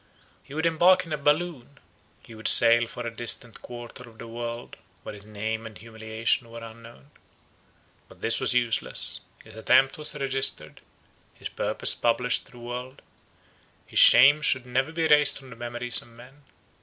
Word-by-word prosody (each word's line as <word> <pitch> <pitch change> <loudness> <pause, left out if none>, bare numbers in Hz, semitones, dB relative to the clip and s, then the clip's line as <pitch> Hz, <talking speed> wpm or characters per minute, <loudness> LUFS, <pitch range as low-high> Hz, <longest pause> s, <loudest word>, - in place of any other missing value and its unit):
He 140 - -14
would 160 +1 -2
embark 180 +3 +3
in 165 - -7
a - - 0
balloon; 145 -2 -2 0.5
he 115 - -14
would 110 0 -3
sail 120 0 +7
for 120 +1 -9
a 115 0 -7
distant 120 0 0
quarter 120 0 -11
of 110 - -21
the 115 - -11
world, 120 +1 -8 0.3
where - - -9
his 105 -1 -14
name 110 +1 -6
and 110 - -13
humiliation 110 +2 -4
were 115 0 -11
unknown. 115 -11 -15 1.0
But - - -18
this 115 - 0
was 130 -1 -1
useless; 120 -2 0 0.2
his - - -16
attempt 130 +6 +1
was 150 0 +3
registered; 135 -2 -1 0.5
his - - -9
purpose - - -1
published 125 +1 -2
to - - -20
the - - -15
world; 125 +3 -9 0.8
his - - -1
shame 145 +4 +7
could 130 -4 0
never 130 +4 -2
be 165 0 -2
erased 150 -1 +3
from 135 -2 -14
the - - -11
memories 120 0 -3
of - - -17
men. 125 +5 -18
120 Hz, 170 wpm, -24 LUFS, 115-135 Hz, 1.0 s, sail